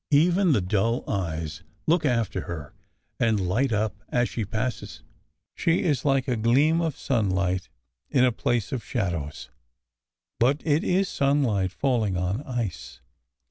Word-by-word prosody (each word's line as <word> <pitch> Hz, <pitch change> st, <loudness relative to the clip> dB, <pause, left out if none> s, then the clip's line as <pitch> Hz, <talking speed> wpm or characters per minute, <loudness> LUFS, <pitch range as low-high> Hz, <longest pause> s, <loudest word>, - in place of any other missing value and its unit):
Even 175 Hz, +5 st, +4 dB
the 115 Hz, -8 st, +3 dB
dull 105 Hz, +6 st, 0 dB
eyes 80 Hz, -6 st, -3 dB, 0.2 s
look 165 Hz, 0 st, +2 dB
after 115 Hz, -5 st, 0 dB
her 80 Hz, -4 st, -7 dB, 0.5 s
and 110 Hz, -3 st, +2 dB
light 120 Hz, +8 st, +1 dB
up 105 Hz, -1 st, 0 dB
as 120 Hz, -1 st, +1 dB
she 115 Hz, -, -3 dB
passes. 110 Hz, +5 st, -4 dB, 0.5 s
She 165 Hz, +1 st, +1 dB
is 145 Hz, -6 st, +1 dB
like 135 Hz, -2 st, +2 dB
a 125 Hz, -, +1 dB
gleam 135 Hz, +9 st, +3 dB
of 160 Hz, -4 st, -2 dB
sun 115 Hz, -7 st, 0 dB
light 95 Hz, 0 st, -1 dB, 0.4 s
in 130 Hz, -1 st, +4 dB
a 125 Hz, -, +3 dB
place 120 Hz, -1 st, -1 dB
of 130 Hz, -4 st, -3 dB
shadows. 85 Hz, -, -3 dB, 0.9 s
But 135 Hz, +5 st, +2 dB
it 155 Hz, 0 st, +2 dB
is 190 Hz, +2 st, +2 dB
sunlight 135 Hz, -, +1 dB
falling 110 Hz, -5 st, 0 dB
on 90 Hz, +7 st, -1 dB
ice. 120 Hz, -, -4 dB
120 Hz, 145 wpm, -26 LUFS, 95-140 Hz, 0.9 s, Even